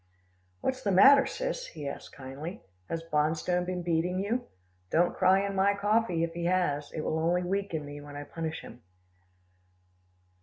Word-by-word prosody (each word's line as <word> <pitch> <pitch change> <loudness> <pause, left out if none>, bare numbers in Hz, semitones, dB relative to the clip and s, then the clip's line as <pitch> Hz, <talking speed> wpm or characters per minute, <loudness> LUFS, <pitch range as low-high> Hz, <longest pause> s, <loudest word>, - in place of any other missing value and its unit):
"What's 260 0 -1
the 205 - 0
matter, 270 +9 +7
Sis?" - - -3
he 150 -3 -7
asked 140 - -7
kindly. 140 +7 -8 0.3
"Has 165 0 -3
Bonstone 160 +3 0
been 180 -1 -3
beating 170 +2 0
you 220 +6 -1 0.4
don't 175 +2 +2
cry 190 +2 +4
in 200 - -3
my 200 +1 +3
coffee, 205 -4 +1
if 165 0 -2
he 170 0 -3
has. 170 -5 0
It 155 - -4
will 160 +1 -1
only 175 +2 +1
weaken 180 -4 -2
me, 145 0 -8
when 145 0 -10
I 145 - -5
punish 160 +2 -5
him." 125 - -12
175 Hz, 165 wpm, -29 LUFS, 155-200 Hz, 0.4 s, matter